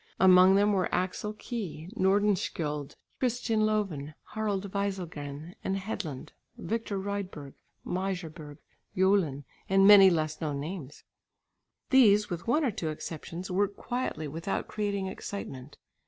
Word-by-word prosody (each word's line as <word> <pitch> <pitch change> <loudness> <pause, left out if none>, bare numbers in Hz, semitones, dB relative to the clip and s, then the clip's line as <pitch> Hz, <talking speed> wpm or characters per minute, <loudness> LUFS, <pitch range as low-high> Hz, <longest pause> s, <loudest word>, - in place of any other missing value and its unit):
Among 185 0 +7
them 205 +1 +4
were 185 -2 +1
Axel 190 +3 -1
Key, 210 -8 -6
Nordenskiöld, 185 -8 0 0.2
Christian 230 -3 +1
Loven, 165 -9 -2 0.2
Harald 205 -3 -2
Wieselgren, 170 -6 -4
Hedlund, 190 -7 -4 0.3
Victor 220 -2 -3
Rydberg, 190 -8 -5 0.3
Meijerberg, 170 -6 -4 0.4
Jolin, 185 -7 +2 0.3
and 195 0 +5
many 200 -1 +10
less 155 -3 -1
known 145 -3 -2
names. 150 -2 -7 0.9
These, 210 -6 +5
with 170 +3 -5
one 295 +6 +3
or 250 - +1
two 165 -5 -3
exceptions, 165 +4 -6
worked 200 +2 0
quietly 245 -11 -3
without 165 +6 -3
creating 200 -2 -2
excitement. 150 -8 -7
190 Hz, 115 wpm, -29 LUFS, 155-205 Hz, 0.9 s, many